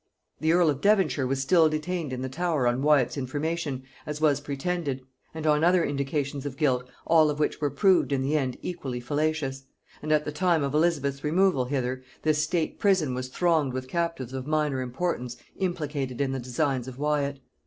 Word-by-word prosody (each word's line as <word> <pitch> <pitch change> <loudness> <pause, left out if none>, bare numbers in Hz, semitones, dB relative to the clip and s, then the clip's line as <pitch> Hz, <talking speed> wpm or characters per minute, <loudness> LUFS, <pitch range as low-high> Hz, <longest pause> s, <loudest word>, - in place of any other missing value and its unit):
The 160 +1 +2
earl 170 -2 +4
of 140 - -5
Devonshire 185 -11 +3
was 135 +1 -1
still 160 +2 +5
detained 155 0 -3
in 130 0 -4
the - - -2
Tower 155 -1 0
on 120 +2 +1
Wyat's 145 -3 +3
information, 145 +1 -2 0.2
as 150 0 -4
was 145 -2 +3
pretended, 145 -1 -3 0.3
and 160 -1 -6
on 150 0 +3
other 175 0 +4
indications 140 0 -2
of 140 -2 -5
guilt, 125 -5 +1 0.2
all 160 -2 +5
of 150 - -2
which 150 +1 -1
were 145 - +2
proved 175 +4 +3
in 135 -1 +1
the 145 +3 0
end 130 -4 0
equally 140 -9 -4
fallacious: 145 0 -2 0.4
and 155 - -3
at 150 -1 +3
the 150 - -3
time 170 0 +2
of 140 0 -2
Elizabeth's 145 -4 +1
removal 165 -3 +2
hither 130 -1 -2 0.2
this 155 -1 +2
state 160 +1 -1
prison 185 -10 +2
was 130 0 -3
thronged 155 -1 +1
with 130 0 -4
captives 165 -5 -2
of 130 0 -5
minor 150 -4 0
importance 125 -2 -3 0.2
implicated 150 -8 -2
in 140 -2 +1
the 135 - -2
designs 125 +1 -1
of 130 -1 -8
Wyat. 145 -1 0
145 Hz, 190 wpm, -27 LUFS, 130-160 Hz, 0.4 s, still